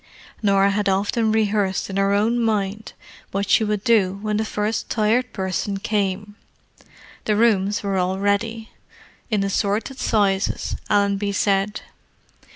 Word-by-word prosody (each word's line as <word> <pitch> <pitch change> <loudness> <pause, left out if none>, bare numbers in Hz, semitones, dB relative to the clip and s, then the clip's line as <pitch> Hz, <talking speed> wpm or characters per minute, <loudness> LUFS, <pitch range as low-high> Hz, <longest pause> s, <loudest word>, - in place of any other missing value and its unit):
Norah 200 -1 +3
had 205 0 0
often 210 +3 +1
rehearsed 210 -3 0
in 195 - -5
her 195 0 +2
own 220 +4 +2
mind 215 -2 -1 0.4
what 200 +1 -2
she - - +4
would 210 -1 -1
do 205 -6 +3
when 210 -1 0
the 220 - 0
first 210 0 -2
Tired 230 +3 +1
Person 190 +1 -2
came. 205 0 -2 0.9
The 210 - +1
rooms 210 -2 +2
were 195 -1 -1
all 185 +1 0
ready—"in 215 +1 -3
assorted 205 +6 -1
sizes," 195 -3 0
Allenby 200 0 +1
said. 200 +1 0
205 Hz, 130 wpm, -22 LUFS, 195-215 Hz, 0.9 s, she